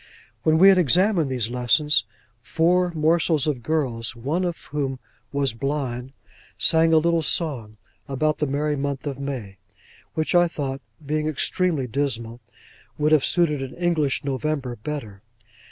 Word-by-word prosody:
When 155 0 +3
we 190 +4 +8
had 190 -1 +5
examined 180 - +3
these 120 -3 -2
lessons, 125 +1 +2 0.4
four 175 +7 +2
morsels 160 -1 +2
of 145 -5 -1
girls 125 -6 -2
(of 170 +8 -1
whom 140 -2 -1
one 130 - -10 0.4
was 135 - +1
blind) 130 -1 -3 0.4
sang 165 0 +4
a 160 - +6
little 165 +1 +2
song, 135 - -2 0.3
about 155 +3 0
the 150 - 0
merry 145 +2 -1
month 140 0 -3
of 140 -2 -4
May, 125 -9 -5 0.6
which 155 - -1
I 175 0 +5
thought 135 -5 -4 0.2
(being 155 +1 -1
extremely 155 0 0
dismal) 120 -2 -3 0.6
would 150 +1 +1
have 155 -3 +5
suited 155 -5 +2
an 130 -1 -6
English 165 -6 0
November 140 -2 -2
better. 110 -5 -6
145 Hz, 145 wpm, -23 LUFS, 130-160 Hz, 0.6 s, we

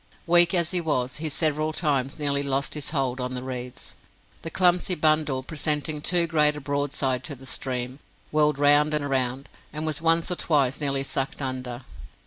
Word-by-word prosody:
Weak 175 0 +5
as 170 -1 +2
he 180 -2 +1
was, 130 -5 -1
he 155 +1 -2
several 155 +1 0
times 140 -5 0
nearly 140 -2 0
lost 140 +1 -1
his 150 -2 -3
hold 135 -4 -1
on 125 0 -3
the 125 - -5
reeds. 125 -1 -7 0.5
The 165 - -6
clumsy 180 +1 +2
bundle 155 -4 +1
presenting 150 0 -2
too 175 +2 +3
great 150 -2 +3
a - - -6
broadside 140 -2 -2
to 145 - -5
the 135 +1 -12
stream, 130 0 -2 0.3
whirled 150 -2 +3
round 145 +1 +4
and 145 -1 -1
round, 130 0 -1 0.2
and 155 +1 -4
was 155 -1 -1
once 165 +1 +2
or - - 0
twice 140 -3 +1
nearly 140 -1 0
sucked 135 0 -3
under. 130 -2 -5
145 Hz, 180 wpm, -25 LUFS, 130-155 Hz, 0.5 s, Weak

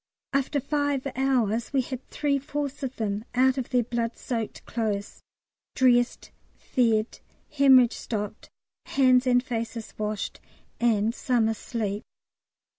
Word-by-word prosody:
After 275 +1 +1
five 285 -1 -1
hours 240 -3 +1
we 270 - +3
had 255 0 -6
three 285 -2 0
fourths 285 0 -4
of 265 -1 -4
them 210 -1 -2
out 260 +1 +4
of 250 - -4
their 250 -2 +2
blood 235 0 -2
soaked 230 -4 -4
clothes, 210 -3 -3 0.5
dressed, 245 -1 +2 0.2
fed, 225 -3 0 0.3
hæmorrhage 265 -4 +6
stopped, 210 -2 -5 0.4
hands 255 -1 +4
and 245 0 +4
faces 230 -2 -4
washed, 210 -1 -3 0.4
and 225 -2 +2
some 240 -3 +1
asleep. 215 -2 -3
245 Hz, 120 wpm, -26 LUFS, 225-265 Hz, 0.5 s, hæmorrhage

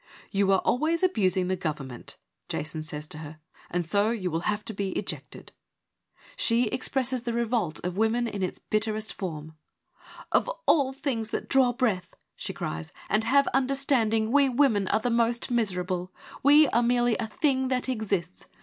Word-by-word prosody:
' - - -22
You 195 -1 +2
are 190 - +4
always 320 +7 +1
abusing 190 - +2
the 185 - +1
gov 165 -5 -2
ernment; 130 -4 -9 0.2
' - - -53
Jason 155 +1 -3
says 150 -1 -6
to 155 - -8
her, 155 0 -9 0.2
' - - -25
and 175 0 -1
so 200 +5 +2
you 195 -6 -2
will 165 - 0
have 210 0 -2
to 220 - -4
be 195 -1 -2
ejected.' - - -6 0.8
She 235 -1 +2
expresses 255 0 0
the 235 0 -3
revolt 230 -9 0
of 180 +1 -3
women 225 +2 +2
in 205 -3 -4
its 185 - -2
bitterest 215 0 -2
form. 160 -5 -6 0.4
' - - -18
Of - - +2 0.2
all 275 -5 +4
things 265 -5 -3
that - - -3
draw 265 -2 +4
breath/ 220 -8 -1 0.2
she - - -5
cries, 80 0 -5
' - - -19
and 215 +2 +2
have 280 +4 +4
understanding, 255 -5 +1
we 280 0 +5
women 235 -7 +2
are 220 - +1
the 245 - 0
most 235 +1 +1
miserable; 185 -5 -1 0.3
we 295 +2 +7
are 235 - +2
merely 240 -1 +2
a 225 - -2
thing 265 +3 +1
that 255 0 0
exists. 200 -8 -2
220 Hz, 185 wpm, -27 LUFS, 185-250 Hz, 0.8 s, we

